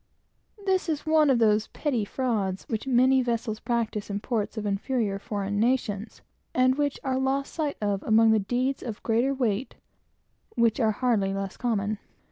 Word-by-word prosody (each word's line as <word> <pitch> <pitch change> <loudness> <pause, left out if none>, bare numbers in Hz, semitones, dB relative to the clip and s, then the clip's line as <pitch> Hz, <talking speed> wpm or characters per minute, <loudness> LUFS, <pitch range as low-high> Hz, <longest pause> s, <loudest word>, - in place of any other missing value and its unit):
This 375 -3 +1
is 305 -2 -2
one 310 -2 +4
of 260 - +4
those 215 -2 +3
petty 250 -8 -1
frauds 205 -6 -1
which 225 +3 -3
every 260 +1 +4
vessel 230 -3 -1
practises 225 -3 -1
in 200 0 -2
ports 220 -1 -2
of 215 - -3
inferior 205 0 -1
foreign 205 -1 -3
nations, 225 -3 -1 0.3
and 255 0 +4
which 285 0 -1
are 260 -1 0
lost 270 +1 -1
sight 300 -3 -2
of, 205 -2 -1
among 220 0 +4
the 220 - +4
countless 195 - -7
deeds 255 +2 0
of 225 -4 -6
greater 240 +4 +1
weight 240 -2 -1 0.8
which 235 -1 +2
are 225 -3 +3
hardly 210 -4 +1
less 195 -1 -4
common. 215 -3 -1
230 Hz, 170 wpm, -26 LUFS, 210-260 Hz, 0.8 s, one